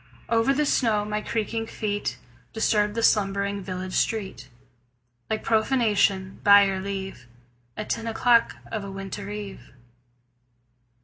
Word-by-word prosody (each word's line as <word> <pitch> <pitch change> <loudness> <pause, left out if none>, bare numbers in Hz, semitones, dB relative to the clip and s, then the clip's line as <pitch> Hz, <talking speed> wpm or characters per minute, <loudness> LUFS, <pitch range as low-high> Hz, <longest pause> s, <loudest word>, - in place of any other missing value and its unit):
Over 230 +3 +3
the 300 +2 +1
snow 220 -7 +2
my 210 0 -2
creaking 225 +1 -2
feet 205 -2 -3 0.4
Disturbed 210 -1 +1
the 230 - -1
slumbering 200 -1 +2
village 185 0 -5
street 200 - -2 0.8
Like 220 - -2
profanation, 215 -5 +1
by 200 0 +8
your 195 -1 0
leave, 190 -9 -6 0.5
At 215 - -4
ten 230 0 -2
o'clock 230 +1 +3 0.2
of 220 -2 -3
a 200 - -6
winter 195 +1 -6
eve. 205 -5 -6
210 Hz, 125 wpm, -25 LUFS, 195-225 Hz, 0.8 s, by